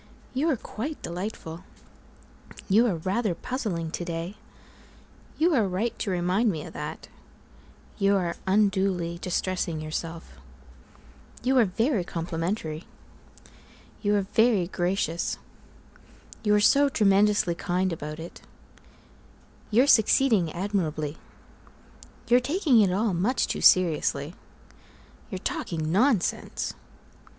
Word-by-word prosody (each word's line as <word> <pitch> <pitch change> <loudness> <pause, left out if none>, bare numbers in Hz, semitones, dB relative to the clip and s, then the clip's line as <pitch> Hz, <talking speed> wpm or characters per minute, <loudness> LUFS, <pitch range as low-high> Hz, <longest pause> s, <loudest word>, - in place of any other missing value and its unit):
You 285 +6 +1
are 280 - +1
quite 275 +8 -6
delightful 175 -2 -6 1.0
You 220 +5 +4
are 195 - 0
rather 190 +4 -1
puzzling 180 -9 -3
to 175 - -4
day 170 +2 -4 1.0
You 335 +2 +3
are 225 -8 +3
right 195 +6 -1
to - - -2
remind 185 +5 +1
me 160 -6 -3
of - - -10
that - - -6 0.9
You 200 0 +3
are 175 -3 -1
unduly 190 -4 +1
distressing 180 -2 -2
yourself 165 +2 -6 1.0
You 260 +1 +2
are 235 - +5
very 220 +2 0
complimentary 165 0 -3 1.2
You 205 -1 +2
are 200 - +2
very 220 -1 +3
gracious 175 -2 -1 1.1
You're 210 -1 +4
so 280 +6 +5
tremendously 205 -5 +3
kind 180 +1 -1
about 150 -1 -6
it 165 +2 -9 1.3
You're 235 +5 +4
succeeding 220 - +4
admirably 165 -5 -2 1.1
You're 240 +1 +5
taking 280 - +3
it 195 -3 +3
all 205 +2 +1
much 200 +10 +1
too - - -3
seriously 160 -4 +3 1.0
You're 195 - -4
talking 160 -3 -3
nonsense! 215 0 +1
190 Hz, 110 wpm, -26 LUFS, 170-220 Hz, 1.3 s, are